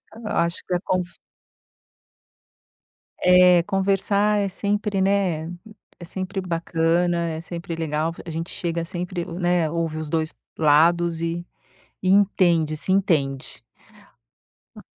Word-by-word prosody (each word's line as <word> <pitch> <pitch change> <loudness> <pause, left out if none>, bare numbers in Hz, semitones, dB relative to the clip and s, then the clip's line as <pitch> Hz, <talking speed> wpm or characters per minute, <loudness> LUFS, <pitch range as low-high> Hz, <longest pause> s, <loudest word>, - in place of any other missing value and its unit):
Eu 225 -1 -8
acho 170 +1 0
que 180 - -2
a 175 - +1
confi 180 -1 -2 2.0
É, 180 -1 +6
conversar 200 +2 +1
é 200 - 0
sempre, 205 +1 -1
né, 190 -5 +1 0.5
é 175 - -9
sempre 190 +3 -4
bacana, 170 0 0
é 160 0 -4
sempre 170 0 -6
legal 160 0 -1
a - - -5
gente 165 +2 -4
chega, 170 -1 -3
sempre, 175 +1 -4
né, 175 -2 0
ouve 165 -2 -2
os 155 - -5
dois 160 0 -1 0.3
lados 165 +2 +3
e 170 +1 -3 0.6
e 185 - 0
entende 175 -6 +3
se 185 +4 -2
entende. 140 -8 0 1.1
A - - -11
175 Hz, 125 wpm, -23 LUFS, 165-185 Hz, 2.0 s, É